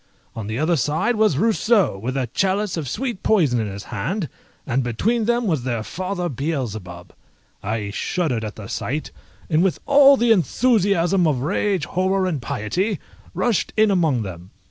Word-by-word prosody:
On 110 Hz, -3 st, -5 dB
the 110 Hz, +1 st, -3 dB
other 160 Hz, +4 st, +2 dB
side 160 Hz, -, 0 dB
was 215 Hz, -9 st, +2 dB
Rousseau, 220 Hz, -, +2 dB
with 125 Hz, +7 st, -4 dB
a 130 Hz, -, 0 dB
chalice 195 Hz, +1 st, 0 dB
of 155 Hz, -6 st, -4 dB
sweet 240 Hz, -, -3 dB
poison 155 Hz, -, +2 dB
in 110 Hz, -, -1 dB
his 100 Hz, 0 st, -7 dB
hand, 155 Hz, -, -2 dB, 0.4 s
and 130 Hz, 0 st, 0 dB
between 215 Hz, -, 0 dB
them 240 Hz, +1 st, +1 dB
was 160 Hz, -, 0 dB
their 120 Hz, -3 st, -2 dB
father 180 Hz, -, -3 dB
Beelzebub! 110 Hz, -, -4 dB, 0.5 s
I 105 Hz, -1 st, -3 dB
shuddered 130 Hz, -, -1 dB
at 105 Hz, -1 st, -5 dB
the 105 Hz, -, -9 dB
sight, 150 Hz, +5 st, -3 dB, 0.4 s
and 160 Hz, -1 st, +2 dB
with 190 Hz, -1 st, +2 dB
all 280 Hz, -1 st, +7 dB
the 235 Hz, -1 st, +3 dB
enthusiasm 195 Hz, -, +2 dB
of 135 Hz, -5 st, 0 dB
rage, 185 Hz, +2 st, 0 dB
horror, 185 Hz, +1 st, 0 dB
and 160 Hz, -8 st, -2 dB
piety, 160 Hz, -, -2 dB, 0.4 s
rushed 235 Hz, -6 st, 0 dB
in 215 Hz, -1 st, +4 dB
among 160 Hz, -, +2 dB
them. 90 Hz, -2 st, -8 dB
165 Hz, 165 wpm, -22 LUFS, 120-200 Hz, 0.5 s, all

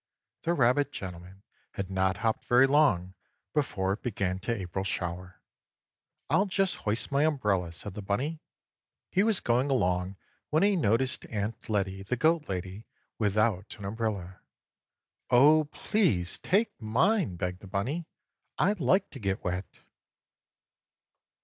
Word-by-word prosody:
The 170 Hz, +1 st, 0 dB
rabbit 140 Hz, +2 st, +3 dB
gentleman 95 Hz, 0 st, -8 dB, 0.3 s
had 95 Hz, -1 st, -4 dB
not 95 Hz, 0 st, +1 dB
hopped 110 Hz, -, 0 dB
very 125 Hz, +2 st, +6 dB
long 135 Hz, -11 st, +3 dB, 0.4 s
before 95 Hz, -10 st, 0 dB
it 105 Hz, -, -7 dB
began 95 Hz, -6 st, -2 dB
to 115 Hz, -, -3 dB
April 95 Hz, -4 st, -3 dB
shower. 90 Hz, -1 st, -4 dB, 0.8 s
"I'll 200 Hz, -, +3 dB
just 195 Hz, 0 st, 0 dB
hoist 105 Hz, +6 st, -2 dB
my 140 Hz, +1 st, +3 dB
umbrella," 105 Hz, -, +1 dB
said 90 Hz, +4 st, -8 dB
the 105 Hz, -, -6 dB
bunny. 135 Hz, +11 st, -2 dB, 0.7 s
He 190 Hz, -, +3 dB
was 215 Hz, -1 st, +3 dB
going 125 Hz, +4 st, +1 dB
along 90 Hz, -6 st, +1 dB, 0.3 s
when 155 Hz, +4 st, +3 dB
he 205 Hz, 0 st, +4 dB
noticed 130 Hz, -, +1 dB
Aunt 110 Hz, +1 st, -4 dB
Lettie, 95 Hz, -2 st, -1 dB
the 100 Hz, +6 st, -2 dB
goat 160 Hz, +3 st, +2 dB
lady, 95 Hz, +3 st, -5 dB, 0.3 s
without 105 Hz, -2 st, +1 dB
an 100 Hz, -, -8 dB
umbrella. 100 Hz, -4 st, -3 dB, 0.9 s
"Oh, 150 Hz, +5 st, +6 dB
please 145 Hz, -, 0 dB
take 205 Hz, -, 0 dB
mine!" 140 Hz, -, +2 dB
begged 90 Hz, 0 st, -3 dB
the 100 Hz, -, -12 dB
bunny. 130 Hz, -, -2 dB, 0.5 s
"I 200 Hz, -, +3 dB
like 190 Hz, +2 st, +1 dB
to 135 Hz, -, -9 dB
get 100 Hz, -2 st, -2 dB
wet!" 90 Hz, +1 st, -2 dB
110 Hz, 135 wpm, -29 LUFS, 95-145 Hz, 0.9 s, very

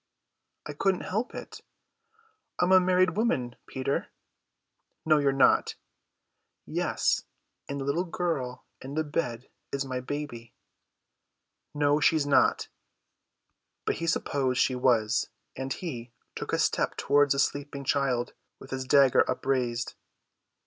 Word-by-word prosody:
"I 150 Hz, -, -5 dB
couldn't 190 Hz, +5 st, +1 dB
help 220 Hz, +6 st, -3 dB
it. -, -, -8 dB, 1.0 s
I -, -, +3 dB
am 180 Hz, -, +1 dB
a 190 Hz, -, +8 dB
married 185 Hz, -1 st, +3 dB
woman, 150 Hz, -, 0 dB
Peter." 130 Hz, +1 st, -2 dB, 1.0 s
"No, 155 Hz, -1 st, +5 dB
you're 140 Hz, -1 st, +3 dB
not." 135 Hz, 0 st, +3 dB, 0.9 s
"Yes, -, -, 0 dB, 0.5 s
and 140 Hz, 0 st, -3 dB
the 135 Hz, -, -4 dB
little 160 Hz, +6 st, 0 dB
girl 155 Hz, -8 st, -3 dB, 0.2 s
in 135 Hz, +2 st, -7 dB
the 155 Hz, -, +1 dB
bed 130 Hz, -6 st, -3 dB, 0.2 s
is 140 Hz, 0 st, -2 dB
my 130 Hz, -1 st, -3 dB
baby." 125 Hz, -3 st, -6 dB, 1.2 s
"No, 145 Hz, 0 st, +3 dB
she's 155 Hz, -1 st, +3 dB
not." 140 Hz, -2 st, +3 dB, 1.2 s
But -, -, 0 dB
he 165 Hz, -, -3 dB
supposed 135 Hz, -5 st, 0 dB
she 130 Hz, -, +3 dB
was; 120 Hz, -3 st, +2 dB, 0.3 s
and 135 Hz, 0 st, -4 dB
he 125 Hz, -8 st, -5 dB, 0.2 s
took -, -, -5 dB
a -, -, +1 dB
step -, -, 0 dB
towards 145 Hz, 0 st, +3 dB
the -, -, -4 dB
sleeping 140 Hz, 0 st, -1 dB
child 130 Hz, -3 st, 0 dB, 0.2 s
with 135 Hz, -, -13 dB
his 130 Hz, 0 st, -3 dB
dagger 135 Hz, -1 st, +5 dB
upraised. 125 Hz, -2 st, -1 dB
140 Hz, 130 wpm, -28 LUFS, 130-155 Hz, 1.2 s, a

